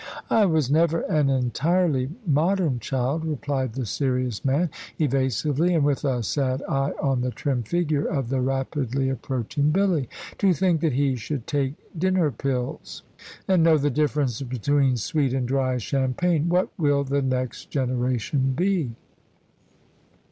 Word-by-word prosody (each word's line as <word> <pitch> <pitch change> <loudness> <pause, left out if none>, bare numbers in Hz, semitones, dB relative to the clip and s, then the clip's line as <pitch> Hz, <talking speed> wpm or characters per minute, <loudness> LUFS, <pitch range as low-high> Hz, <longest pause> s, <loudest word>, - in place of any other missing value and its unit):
"I 215 -3 +5
was 155 -6 +1
never 165 +2 +3
an 150 -3 +1
entirely 135 - +1 0.2
modern 160 -2 +1
child," 130 +6 -1
replied 140 -5 -2
the 130 0 -3
serious 125 -2 -1
man, 145 +5 +1 0.3
evasively, 145 - +1
and 155 - +3
with 145 0 0
a 130 -4 0
sad 130 +6 -1
eye 135 +1 0
on 135 -3 +1
the 125 - 0
trim 130 0 -2
figure 150 +4 0
of 135 -7 -2
the 130 0 0
rapidly 135 0 -1
approaching 135 +2 -1
Billy. 175 - +1 0.3
"To 195 -3 +4
think 175 -2 +1
that 160 -5 +1
he 135 0 +1
should 125 +2 -4
take 140 -1 -1 0.2
dinner 180 -2 +2
pills, 125 0 -4 0.4
and 185 -3 +4
know 160 -1 +5
the 145 0 +1
difference 145 -3 0
between 130 +1 +1
sweet 140 - 0
and 130 -2 -1
dry 130 -1 0
champagne! 140 +7 0
What 180 +2 +2
will 145 -3 +2
the 140 +1 0
next 130 -2 -2
generation 130 0 0
be?" 175 -8 0
140 Hz, 145 wpm, -24 LUFS, 130-155 Hz, 0.4 s, I